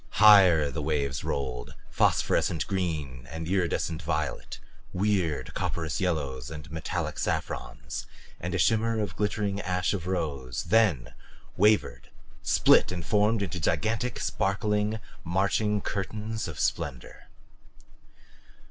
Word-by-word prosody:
Higher 95 -8 +7
the 75 - -4
waves 70 -2 -1
rolled 65 -3 -3 0.2
phosphorescent 80 -3 +2
green 75 -10 -3
and 80 0 -5
iridescent 85 -3 0
violet, - - -3 0.4
weird 90 -9 0
copperous 80 -2 -2
yellows 70 -8 -2
and 75 -1 -9
metallic 80 0 -3
saffrons - - -3 0.3
and - - -3
a - - +2
shimmer 115 0 +2
of 105 - -3
glittering 105 -1 -1
ash 90 +1 0
of 90 -4 -4
rose 70 -9 -2
then 85 - +2 0.4
wavered, 105 +2 +2 0.3
split - - +4
and 85 -2 -4
formed 105 +2 +2
into 90 -1 -4
gigantic, 110 - 0
sparkling, 105 +2 0 0.2
marching 100 +4 +1
curtains 105 +3 -3
of 80 - -7
splendor. 65 -4 -3
90 Hz, 110 wpm, -28 LUFS, 75-105 Hz, 0.4 s, Higher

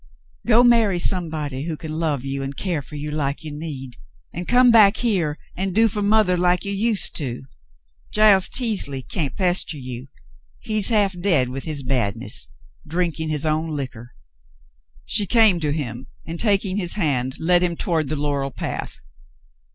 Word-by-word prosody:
Go 235 +1 +6
marry 230 -6 +4
somebody 155 -6 -1
who 165 -2 -4
can 155 0 -7
love 155 -5 -2
you 135 0 -3
and 135 0 -6
care 175 -6 -2
for 150 - -11
you 150 +1 -5
like 145 -1 -2
you 155 - -6
need, 135 -5 -7 0.4
and 175 +1 -6
come 245 0 +5
back 215 -2 +6
here 180 -11 0 0.2
and 190 0 -3
do 225 +1 +5
for 210 -1 -3
mother 205 -2 +3
like 180 +2 +1
you 200 - -2
used 210 +1 +1
to. 130 -5 -3 0.7
Giles 210 -3 +4
Teasley 195 - +1
can't 150 -5 -3
pester 180 -4 0
you. 125 -1 -7 0.5
He's 215 -1 +1
half 205 -4 +2
dead 165 -10 +3
with 130 +2 -6
his 150 -4 -3
badness 115 - -1 0.2
— 70 - -29
drinking 165 -3 -1
his 150 0 -2
own 155 +1 0
liquor." 130 -6 -6 0.9
She 205 -2 0
came 220 -6 +4
to 150 -3 -1
him, 130 -5 -5 0.2
and, 165 +1 -7
taking 200 -3 +1
his 175 -4 +1
hand, 130 -9 -1
led 175 +2 +4
him 175 -1 0
toward 160 -3 -1
the 155 - -1
laurel 140 -1 -2
path. 115 - -6
160 Hz, 170 wpm, -21 LUFS, 140-195 Hz, 0.9 s, Go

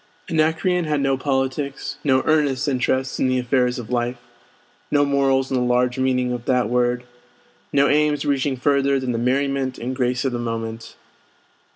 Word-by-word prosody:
Anacreon 165 +3 +1
had 150 -1 0
no 135 -1 +1
politics, 135 +1 -2
no 130 -2 +2
earnest 145 -3 +1
interest 130 0 0
in - - +2
the 130 0 +1
affairs 125 0 +1
of 120 -1 -7
life, 120 0 -1 0.7
no 145 0 +3
morals 135 -1 +1
in - - +1
the - - +1
large 125 +1 +1
meaning 125 -1 +1
of 120 -1 -6
that 125 -4 +1
word, 120 0 +1 0.7
no 140 0 +4
aims 150 0 +2
reaching 140 -1 0
further 140 +1 +2
than 130 -1 -2
the 115 - -2
merriment 135 +1 0
and 125 +3 -4
grace 125 0 0
of 135 - +1
the 120 - -3
moment. 115 -1 -5
130 Hz, 170 wpm, -22 LUFS, 125-140 Hz, 0.7 s, no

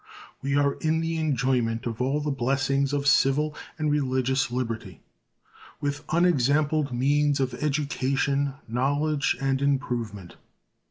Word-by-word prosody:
We 140 +1 -1
are 140 -1 +3
in 160 0 +1
the 165 0 -2
enjoyment 125 -6 0
of 115 0 -4
all 135 +4 0
the 150 0 -1
blessings 135 +1 0
of 145 -1 -1
civil 145 +2 +3 0.2
and 155 -1 0
religious 130 -2 +1
liberty, 115 -7 -4 0.8
with 145 0 -3
unexampled 155 -3 +2
means 145 +3 +2
of 130 -2 0
education, 140 -1 0
knowledge, 145 +5 0
and 135 0 0
improvement. 120 - -2
140 Hz, 120 wpm, -26 LUFS, 130-145 Hz, 0.8 s, are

